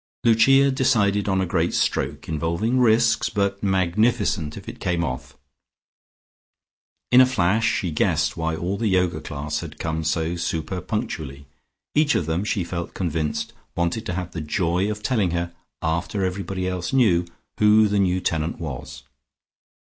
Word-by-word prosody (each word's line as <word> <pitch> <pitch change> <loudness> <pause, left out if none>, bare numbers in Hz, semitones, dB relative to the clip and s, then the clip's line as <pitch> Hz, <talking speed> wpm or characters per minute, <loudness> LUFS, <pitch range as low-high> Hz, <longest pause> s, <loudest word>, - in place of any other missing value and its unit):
Lucia 135 +4 +5
decided 105 -7 +2
on 95 0 +2
a 95 - +1
great 85 -1 0
stroke, - - -1
involving 85 - 0
risks 115 -1 +3
but 100 -1 -1
magnificent 95 -3 +1
if - - -10
it - - -8
came 85 -2 0
off. 65 -5 -5 1.7
In 125 +1 +8
a - - +8
flash 110 -2 +2
she 90 - -1
guessed 75 - +1
why 80 -1 -1
all 90 +4 -2
the 115 - 0
Yoga 90 -5 +1
class 75 0 -4
had 80 -3 -8
come 80 0 -2
so 80 +2 0
super 85 +2 -3
punctually; 75 - -4 0.5
each 150 0 +3
of 85 - +1
them 80 +4 -1
she 105 -2 -1
felt 85 0 -5
convinced 80 -4 -2 0.2
wanted 85 +5 -1
to 90 - -2
have 90 -2 -4
the 85 - -5
joy 90 +5 0
of 105 0 -5
telling 110 -7 +1
her, 85 0 -3 0.3
after 85 +4 -1
everybody 95 0 -3
else 90 -1 -3
knew, 110 -10 +4 0.4
who 105 +1 +6
the 105 0 +1
new 95 -1 +2
tenant 80 -2 -1
was. 70 -7 -7
90 Hz, 155 wpm, -23 LUFS, 80-105 Hz, 1.7 s, In